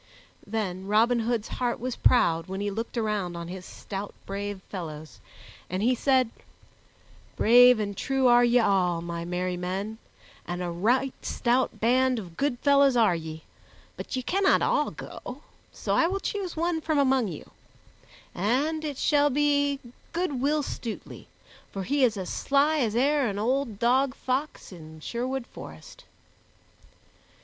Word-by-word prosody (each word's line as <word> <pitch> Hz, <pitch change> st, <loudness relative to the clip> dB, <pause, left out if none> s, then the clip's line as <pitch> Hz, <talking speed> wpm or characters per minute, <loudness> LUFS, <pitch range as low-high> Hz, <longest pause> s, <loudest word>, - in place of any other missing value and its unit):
Then 195 Hz, -3 st, -3 dB
Robin 230 Hz, +4 st, +3 dB
Hood's 230 Hz, -1 st, -1 dB
heart 245 Hz, -1 st, 0 dB
was 250 Hz, +1 st, -3 dB
proud 165 Hz, -9 st, +3 dB
when 190 Hz, +1 st, -5 dB
he 205 Hz, 0 st, -2 dB
looked 225 Hz, +4 st, -5 dB
around 210 Hz, -6 st, -1 dB
on 170 Hz, 0 st, -6 dB
his 185 Hz, 0 st, -8 dB
stout, 200 Hz, 0 st, -7 dB
brave 200 Hz, 0 st, -4 dB
fellows, 155 Hz, -5 st, -8 dB, 0.5 s
and 185 Hz, +3 st, -2 dB
he 250 Hz, +3 st, +4 dB
said, 255 Hz, -2 st, +2 dB, 1.0 s
"Brave 245 Hz, +1 st, +7 dB
and 205 Hz, -1 st, -3 dB
true 270 Hz, +5 st, 0 dB
are 240 Hz, 0 st, +6 dB
ye 240 Hz, 0 st, +4 dB
all, 185 Hz, -6 st, +2 dB
my 170 Hz, 0 st, -5 dB
merry 180 Hz, +1 st, -2 dB
men, 195 Hz, +5 st, -4 dB, 0.5 s
and 175 Hz, +1 st, -3 dB
a 175 Hz, -, -3 dB
right 245 Hz, +10 st, +1 dB
stout 240 Hz, -3 st, 0 dB
band 255 Hz, +3 st, +3 dB
of 180 Hz, -6 st, -7 dB
good 280 Hz, +1 st, 0 dB
fellows 280 Hz, -2 st, +4 dB
are 220 Hz, -6 st, +4 dB
ye, 160 Hz, -1 st, -7 dB, 0.5 s
but -, -, -6 dB
ye 255 Hz, -, -2 dB
cannot 390 Hz, +7 st, +2 dB
all -, -, +2 dB
go, -, -, -9 dB, 0.3 s
so -, -, -3 dB
I 335 Hz, -, +4 dB
will 390 Hz, +3 st, -2 dB
choose 390 Hz, -5 st, -4 dB
one 335 Hz, 0 st, 0 dB
from 315 Hz, -1 st, 0 dB
among 265 Hz, -4 st, +3 dB
you, 165 Hz, -5 st, -8 dB, 0.8 s
and 275 Hz, -, 0 dB
it 290 Hz, -3 st, -4 dB
shall 290 Hz, 0 st, +3 dB
be 285 Hz, 0 st, +2 dB, 0.3 s
good 335 Hz, -7 st, -1 dB
Will 295 Hz, +2 st, +1 dB
Stutely, 230 Hz, -4 st, -7 dB, 0.4 s
for 195 Hz, -, -4 dB
he 280 Hz, +7 st, +1 dB
is 230 Hz, -4 st, +3 dB
as 185 Hz, -2 st, -4 dB
sly 290 Hz, +3 st, +2 dB
as 225 Hz, -5 st, 0 dB
e'er 280 Hz, +2 st, +2 dB
an 200 Hz, -2 st, -3 dB
old 240 Hz, 0 st, -1 dB
dog 255 Hz, +4 st, +2 dB
fox 265 Hz, 0 st, -3 dB
in 160 Hz, -3 st, -11 dB
Sherwood 250 Hz, +8 st, -3 dB
Forest." -, -, -12 dB
235 Hz, 155 wpm, -27 LUFS, 195-270 Hz, 1.0 s, Brave